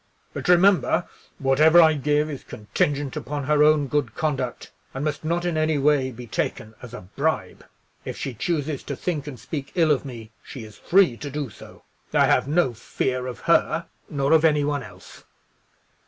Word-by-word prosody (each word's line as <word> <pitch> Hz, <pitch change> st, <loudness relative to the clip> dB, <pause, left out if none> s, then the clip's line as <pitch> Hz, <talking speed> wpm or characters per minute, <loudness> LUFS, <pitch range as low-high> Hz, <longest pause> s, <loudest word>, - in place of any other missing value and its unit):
But -, -, -5 dB
remember, 180 Hz, 0 st, +4 dB, 0.3 s
whatever 150 Hz, +5 st, +5 dB
I 160 Hz, -2 st, +7 dB
give 150 Hz, +1 st, +1 dB
is 145 Hz, -3 st, -7 dB
contingent 140 Hz, +6 st, -2 dB
upon 145 Hz, -1 st, -4 dB
her 150 Hz, +2 st, +2 dB
own 150 Hz, -1 st, +4 dB
good 135 Hz, -5 st, -2 dB
conduct, 135 Hz, -6 st, -3 dB, 0.2 s
and 135 Hz, +3 st, -3 dB
must 150 Hz, 0 st, -3 dB
not 170 Hz, +2 st, -1 dB
in 170 Hz, -2 st, -1 dB
any 155 Hz, -1 st, +1 dB
way 140 Hz, -2 st, +2 dB
be 125 Hz, -1 st, -9 dB
taken 110 Hz, -1 st, -3 dB
as 125 Hz, -, -9 dB
a -, -, -8 dB
bribe. 140 Hz, -, -3 dB, 0.4 s
If -, -, -6 dB
she 135 Hz, -, -4 dB
chooses 150 Hz, +3 st, -2 dB
to 140 Hz, -, -4 dB
think 150 Hz, -1 st, -3 dB
and 130 Hz, -5 st, -7 dB
speak 140 Hz, +2 st, -6 dB
ill 165 Hz, -3 st, +3 dB
of 140 Hz, -, +1 dB
me, 115 Hz, -5 st, -9 dB
she 130 Hz, -5 st, -9 dB
is 110 Hz, -1 st, -12 dB
free 180 Hz, -10 st, +3 dB
to 145 Hz, -, -6 dB
do 140 Hz, -4 st, -4 dB
so. -, -, -14 dB, 0.3 s
I -, -, +5 dB
have -, -, +2 dB
no 150 Hz, -4 st, +2 dB
fear 125 Hz, +3 st, -3 dB
of 125 Hz, -, -7 dB
her; -, -, +2 dB, 0.2 s
nor 140 Hz, -1 st, -1 dB
of 160 Hz, 0 st, +5 dB
any 150 Hz, -2 st, +3 dB
one 145 Hz, -1 st, -1 dB
else." 95 Hz, -3 st, -13 dB
145 Hz, 185 wpm, -24 LUFS, 130-155 Hz, 0.4 s, I